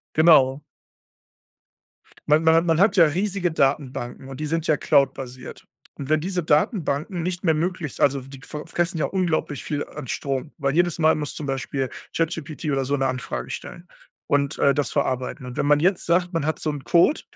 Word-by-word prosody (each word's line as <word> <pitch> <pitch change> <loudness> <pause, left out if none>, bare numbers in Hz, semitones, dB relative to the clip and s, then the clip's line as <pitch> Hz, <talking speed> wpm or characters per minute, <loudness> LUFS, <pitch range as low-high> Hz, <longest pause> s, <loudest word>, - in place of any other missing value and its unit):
Genau. 150 -4 +5 1.7
Man 150 +2 +5
man 160 0 +5
hat 165 +1 +4
man 165 -1 +2
hat 200 +4 +4
ja 170 - +8
riesige 185 +3 -1
Datenbanken, 135 -3 -1
und 135 - -8
die 155 - -3
sind 165 +1 -1
ja 155 - +3
cloud-basiert. 130 -3 -1 0.3
Und 140 0 -8
wenn 155 0 +3
diese 180 +2 -2
Datenbanken 155 - 0
nicht 180 +1 -3
mehr 160 -3 +3
möglich 165 -2 -3
also 140 0 +4
f 130 - -13
die 135 -1 -11
fr 150 -1 -7
fressen 175 0 -1
ja - - +1
unglaublich 170 -6 -1
viel 145 -1 -2
an 150 -3 -9
Strom, 135 +3 -3
weil 140 -2 0
jedes 175 0 +2
Mal 160 -1 +4
muss 150 -1 -4
zum 150 - -6
Beispiel 135 0 -2 0.3
ChatGPT 165 -1 -3
oder 135 -2 0
so 140 +2 -1
'ne 135 -1 0
Anfrage 130 -1 -4
stellen 175 +1 -8 0.4
und, 140 +1 0
äh, 140 -1 +4
das 145 - -1
verarbeiten. 130 -2 -2
Und 125 - -8
wenn - - 0
man 145 0 +4
jetzt 185 +3 +1
sagt, 180 +1 +1
man 165 -3 0
hat 155 +1 -1
so - - -3
'n 145 -2 -6
Code, 175 - +3
150 Hz, 195 wpm, -23 LUFS, 140-170 Hz, 1.7 s, ja